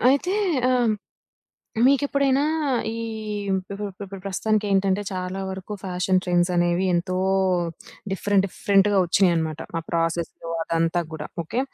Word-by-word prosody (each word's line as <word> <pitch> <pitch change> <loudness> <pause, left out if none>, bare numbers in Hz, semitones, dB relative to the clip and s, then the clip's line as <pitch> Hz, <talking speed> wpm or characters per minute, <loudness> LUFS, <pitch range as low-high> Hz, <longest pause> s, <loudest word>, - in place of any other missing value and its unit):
అయితే 360 +8 +1 0.4
ఆహ్, 240 -3 +3 0.9
మీకెప్పుడైనా 280 0 +3 0.5
ఈ - - -5 0.6
ఇప్పుడు 195 +2 -3 0.2
ఇప్పుడు 195 0 -9
ప్రస్తుతానికేంటంటే 200 -1 +1
చాలా 185 +1 -3
వరకు 190 +2 -6
ఫ్యాషన్ 185 0 +1
ట్రెండ్స్ 175 0 +2
అనేవి 175 +2 +2
ఎంతో 185 +1 0 1.0
డిఫరెంట్ 195 0 +2
డిఫరెంట్‌గా 200 +1 +3
ఒచ్చినాయన్నమాట. 165 -4 +2 0.2
ఆ - - -2
ప్రాసెస్సు 165 0 -2
అదంతా 165 +1 +1
గూడా. 155 -1 -5 0.2
ఓకే. 235 +10 -2
190 Hz, 105 wpm, -24 LUFS, 175-205 Hz, 1.0 s, ఆహ్